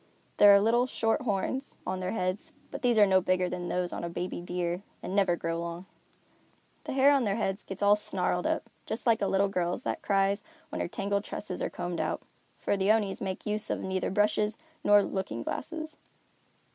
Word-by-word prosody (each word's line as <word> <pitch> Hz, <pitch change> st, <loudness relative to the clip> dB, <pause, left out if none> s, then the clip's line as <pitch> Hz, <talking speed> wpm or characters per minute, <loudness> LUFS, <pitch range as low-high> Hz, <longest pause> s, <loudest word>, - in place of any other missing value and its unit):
There 205 Hz, -, +9 dB
are -, -, +7 dB
little, 235 Hz, +4 st, +3 dB
short 225 Hz, -3 st, 0 dB
horns 250 Hz, +4 st, -2 dB
on 185 Hz, 0 st, -2 dB
their 185 Hz, +2 st, -2 dB
heads, 185 Hz, -1 st, -2 dB, 0.2 s
but -, -, -6 dB
these 240 Hz, -2 st, +3 dB
are 210 Hz, -, +8 dB
no 190 Hz, -1 st, +4 dB
bigger 185 Hz, 0 st, +1 dB
than 180 Hz, -1 st, -4 dB
those 180 Hz, -1 st, -1 dB
on -, -, -4 dB
a 170 Hz, -, -2 dB
baby 175 Hz, +1 st, -4 dB
deer 175 Hz, 0 st, -2 dB, 0.2 s
and 185 Hz, -, -4 dB
never 195 Hz, -4 st, +3 dB
grow 165 Hz, 0 st, -2 dB
long. 170 Hz, +1 st, -5 dB, 1.0 s
The -, -, -3 dB
hair 270 Hz, +1 st, +6 dB
on 275 Hz, -3 st, +3 dB
their 200 Hz, -3 st, +1 dB
heads 195 Hz, -2 st, -1 dB
gets 195 Hz, +1 st, -5 dB
all 205 Hz, 0 st, +6 dB
snarled 180 Hz, -3 st, -1 dB
up, -, -, -1 dB, 0.2 s
just 220 Hz, -, -3 dB
like 230 Hz, -3 st, +3 dB
a 200 Hz, -, +2 dB
little 195 Hz, +1 st, +3 dB
girl's 180 Hz, +3 st, -1 dB
that -, -, -2 dB
cries 200 Hz, 0 st, +2 dB, 0.3 s
when 310 Hz, -, -3 dB
her -, -, -1 dB
tangled 200 Hz, +2 st, -1 dB
tresses 190 Hz, -3 st, -5 dB
are -, -, 0 dB
combed 175 Hz, -1 st, -4 dB
out; -, -, -2 dB, 0.3 s
for -, -, 0 dB
the 195 Hz, +1 st, +3 dB
Onis 210 Hz, -3 st, +1 dB
make 190 Hz, -1 st, -4 dB
use 215 Hz, +1 st, -1 dB
of -, -, -1 dB
neither 190 Hz, -1 st, -1 dB
brushes 210 Hz, +2 st, +1 dB, 0.3 s
nor 205 Hz, 0 st, +6 dB
looking 115 Hz, -, -3 dB
glasses. 315 Hz, -, -5 dB
195 Hz, 205 wpm, -29 LUFS, 180-215 Hz, 1.0 s, There